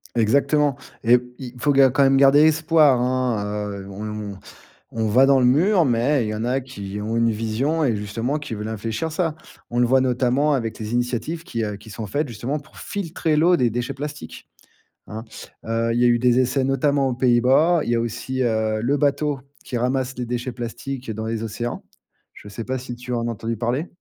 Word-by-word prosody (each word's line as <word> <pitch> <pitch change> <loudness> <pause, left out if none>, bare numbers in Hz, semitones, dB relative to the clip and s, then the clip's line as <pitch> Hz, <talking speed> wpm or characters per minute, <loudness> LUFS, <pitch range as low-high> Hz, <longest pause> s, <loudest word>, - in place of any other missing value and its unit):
Exactement 140 +5 +2 0.3
et 120 +1 +5 0.2
il 125 -3 -7
faut 145 - +2
ga 135 -1 +6
quand 130 +2 +2
même 135 0 +4
garder 140 +1 +6
espoir, 155 -4 +4
hein, 125 -4 0 0.4
heu, 95 - -11
on 105 0 -6 0.6
on 110 -1 +1
va 125 +6 +5
dans 135 -1 +5
le - - +4
mur, 175 +9 +4
mais 125 +1 +2
il - - -3
y - - -2
en 110 +2 -3
a 130 +2 0
qui 100 -6 -7
ont 110 +2 -3
une 115 0 +3
vision 115 +9 -1
et 120 -6 +2
justement 115 +8 -2
qui 145 -5 -7
veulent 105 +1 -5
infléchir 110 +8 -3
ça. 165 -1 -1 0.3
On 120 - -4
le 125 - +4
voit 130 +2 +4
notamment 130 +3 +1
avec 115 -5 -2
les 110 +1 -5
initiatives 125 +7 -2
qui, 115 -10 -3
heu, 105 -1 -4
qui 105 +2 -13
sont 110 +1 -6
faites 145 +9 -1
justement 120 +6 -3
pour 145 +1 -19
filtrer 170 -5 -2
l'eau 170 +4 +4
des 125 -2 +2
déchets 120 +4 -3
plastiques, 145 +2 -8 0.6
hein. 110 +2 -7 0.4
Heu, 115 +1 -1
il 115 - 0
y - - +4
a - - +6
eu 120 0 +3
des 125 0 +3
essais 130 +2 +1
notamment 135 +1 +1
aux 125 - -1
Pays-Bas, 130 +7 +3
il - - -3
y - - +2
a - - +1
aussi, 130 +3 -3
heu, 110 -2 0
le 135 +5 +1
bateau 145 0 0 0.2
qui 125 - -4
ramasse 130 +1 -1
les 125 -1 -4
déchets 125 +2 -3
plastiques 125 +2 -6
dans 110 +1 -4
les 115 0 -3
océans, 115 +2 -4 0.5
je - - -12
sais 105 +3 -6
pas 130 +2 -2
si 125 -1 -7
tu 125 +1 -8
as - - 0
en 115 - -2
as - - -1
entendu 115 +1 -4
parler? 120 - -1
125 Hz, 215 wpm, -22 LUFS, 115-140 Hz, 0.6 s, ga